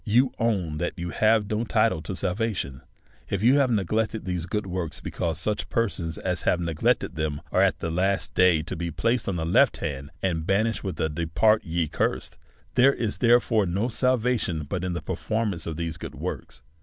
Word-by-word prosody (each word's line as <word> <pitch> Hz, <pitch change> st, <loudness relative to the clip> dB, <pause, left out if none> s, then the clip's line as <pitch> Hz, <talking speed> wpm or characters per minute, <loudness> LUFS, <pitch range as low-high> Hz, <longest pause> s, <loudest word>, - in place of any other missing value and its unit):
Vou 125 Hz, +5 st, +4 dB
own 95 Hz, -10 st, 0 dB
that 85 Hz, -, -2 dB
you 85 Hz, 0 st, -4 dB
have 110 Hz, -1 st, +3 dB
no 105 Hz, +2 st, -1 dB
title 110 Hz, -6 st, +2 dB
to 85 Hz, +4 st, -5 dB
salvation, 90 Hz, -, -2 dB, 0.5 s
if 100 Hz, +1 st, -1 dB
you 130 Hz, +5 st, +6 dB
have 135 Hz, -2 st, +3 dB
neglected 110 Hz, +1 st, 0 dB
these 90 Hz, -2 st, -2 dB
good 105 Hz, +2 st, -2 dB
works; 90 Hz, -4 st, -4 dB
because 80 Hz, -2 st, -3 dB
such 105 Hz, +4 st, -2 dB
per 115 Hz, 0 st, +2 dB
sons 80 Hz, -3 st, -5 dB
as 90 Hz, -1 st, -2 dB
have 90 Hz, -, +2 dB
neglected 85 Hz, -3 st, 0 dB
them 75 Hz, -2 st, -2 dB
are -, -, +3 dB
at -, -, +3 dB
the 85 Hz, -, -2 dB
last 95 Hz, +3 st, 0 dB
day 90 Hz, -4 st, +4 dB
to 85 Hz, -, -5 dB
be 85 Hz, +1 st, -3 dB
placed 115 Hz, +8 st, 0 dB
on 95 Hz, -, -1 dB
the 80 Hz, -2 st, -2 dB
left 85 Hz, -, +4 dB
hand, 70 Hz, 0 st, -4 dB
and 80 Hz, -4 st, -1 dB
banished 110 Hz, +3 st, +1 dB
with 95 Hz, -3 st, -4 dB
a -, -, +2 dB
depart 85 Hz, +8 st, +2 dB
ye 85 Hz, -3 st, -1 dB
cursed. -, -, -2 dB, 0.3 s
There 130 Hz, +2 st, +5 dB
is, 110 Hz, -3 st, -2 dB
therefore, 115 Hz, -4 st, +4 dB
no 100 Hz, +8 st, 0 dB
salvation 120 Hz, -8 st, +1 dB
but 90 Hz, +5 st, -4 dB
in 90 Hz, -1 st, -1 dB
the 85 Hz, -, -4 dB
performance 105 Hz, -7 st, -2 dB
of 80 Hz, -2 st, -4 dB
these 85 Hz, -2 st, -3 dB
good -, -, -8 dB
works. 65 Hz, -2 st, -6 dB
95 Hz, 200 wpm, -26 LUFS, 85-110 Hz, 0.5 s, you